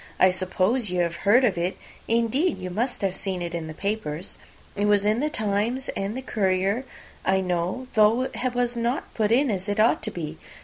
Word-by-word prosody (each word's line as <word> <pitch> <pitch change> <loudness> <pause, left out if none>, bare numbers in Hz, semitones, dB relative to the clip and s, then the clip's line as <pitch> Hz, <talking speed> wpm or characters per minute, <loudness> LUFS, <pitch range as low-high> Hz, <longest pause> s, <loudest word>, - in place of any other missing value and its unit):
I 185 - +6
suppose 185 +5 0
you 180 0 0
have 170 -1 -1
heard 245 +6 +6
of 195 -7 +1
it; 175 +2 -1 0.3
indeed, 235 +9 +1
you 185 0 -6
must 230 +3 -1
have 190 -2 +1
seen 185 -2 -2
it 170 0 -5
in 165 -2 -3
the 155 - -6
papers. 195 -5 -3 0.4
It 205 0 0
was 205 -1 +3
in 215 +2 +2
the 300 +3 0
'Times' 220 +3 -1
and 200 +4 -3
the 260 - -5
'Courier,' 200 +2 0 0.4
I 190 0 +2
know; 180 +7 -1
though 220 +3 +4
it 255 -1 -3
was 245 0 +1
not 235 +3 -2
put 215 -1 0
in 260 +2 +4
as 190 0 -3
it 205 +1 -1
ought 220 +2 +4
to 215 - -1
be. 160 -5 -6
205 Hz, 210 wpm, -25 LUFS, 185-235 Hz, 0.4 s, I